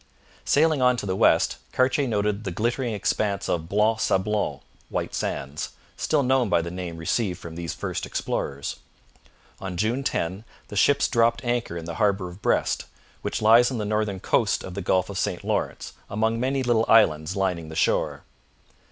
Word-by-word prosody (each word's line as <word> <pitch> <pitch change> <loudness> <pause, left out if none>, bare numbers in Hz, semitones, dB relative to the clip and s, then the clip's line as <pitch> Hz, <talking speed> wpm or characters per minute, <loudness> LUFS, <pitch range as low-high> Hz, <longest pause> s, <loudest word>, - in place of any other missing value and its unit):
Sailing 155 -1 +3
on 125 0 +4
to - - -4
the 95 -1 -1
west, - - +3 0.2
Cartier 130 +2 +2
noted 105 -1 0
the 95 - -3
glittering 120 +6 -1
expanse 100 -1 -1
of 80 -1 -2
Blanc 110 +2 +2
Sablon 105 0 0 0.3
(White - - -3
Sands), 70 +2 -3 0.2
still 150 -3 +1
known 130 -3 +2
by - - +3
the 85 - -5
name 90 -2 -5
received 90 +3 -1
from 85 - -9
these 85 -2 -5
first - - -4
explorers. 70 0 -3 0.8
On 95 -2 -5
June 115 +8 0
10 95 -4 -2 0.3
the 105 - -7
ships 140 +8 +4
dropped 115 +1 +2
anchor 120 -8 -1
in 85 - -6
the 85 - -5
harbour 100 -3 +2
of 90 +4 -13
Brest, - - +1 0.4
which - - -3
lies 115 +3 +7
on 130 - -3
the 105 - -2
northern 105 -2 -1
coast - - +1
of 95 - -7
the 100 - -4
Gulf 95 0 +1
of 100 -1 -4
St - - -2
Lawrence - - -2 0.2
among 110 +2 0
many 130 +2 0
little 120 -2 +2
islands 85 -6 +4
lining 90 -5 -1
the 80 - -8
shore. - - +1
105 Hz, 180 wpm, -25 LUFS, 90-120 Hz, 0.8 s, lies